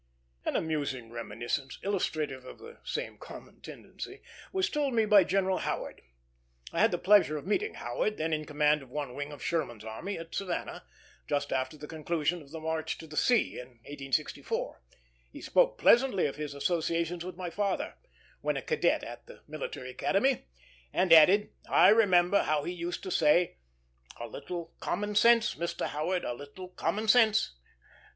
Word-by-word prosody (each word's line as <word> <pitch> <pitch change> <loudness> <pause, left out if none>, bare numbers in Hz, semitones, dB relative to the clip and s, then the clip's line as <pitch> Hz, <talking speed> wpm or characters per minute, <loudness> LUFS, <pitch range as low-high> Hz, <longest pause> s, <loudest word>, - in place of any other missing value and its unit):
An - - -1
amusing 140 -7 -2
reminiscence, 120 +4 -4
illustrative 155 -9 -2
of 130 - -11
the 465 +2 -13
same - - -4
common - - -12
tendency, - - -9 0.3
was 380 -1 +1
told 285 -4 -1
me 225 -1 +4
by 205 -2 +7
General 190 0 +1
Howard. - - -4 0.7
I - - -1
had - - +5
the 175 - -1
pleasure 185 -4 +4
of 145 - -7
meeting 415 - 0
Howard, 215 0 -2
then 160 +1 -1
in 155 0 -1
command 150 0 +2
of 135 - -14
one 140 -1 -4
wing 145 +2 -5
of 145 - -9
Sherman's 130 -10 -2
army, 110 - -5
at 165 0 -9
Savannah, 185 -3 -4 0.4
just 145 -1 -1
after 130 +3 -2
the 150 - -8
conclusion 160 +2 -2
of 140 - -15
the 160 +2 -7
march 160 0 -2
to - - -10
the 155 -1 -11
sea, 240 +7 +2
in 125 - -8 0.2
1864. 145 - -3 0.5
He - - -10
spoke - - +2
pleasantly 240 - +4
of 140 - -2
his 150 -1 -5
associations 170 +3 -1
with 180 0 -7
my 180 -2 -5
father, 200 +2 -1 0.5
when - - 0
a - - -4
cadet 470 -1 +1
at - - -9
the - - -13
Military 130 - -6
Academy, 230 - +1 0.4
and 180 -3 +4
added, 185 +6 +7 0.2
"I - - +7
remember 200 -3 +5
how 150 -1 0
he 175 - -3
used 175 0 -4
to 185 - -5
say, 165 +2 +3 0.6
'A 120 - -5
little 165 +7 -7
common 210 0 -2
sense, 235 +2 +5
Mr. 170 0 -3
Howard, 170 +5 -1
a - - -2
little 145 +8 -10
common 215 +4 -2
sense.'" 220 - +5
170 Hz, 170 wpm, -30 LUFS, 145-205 Hz, 0.7 s, by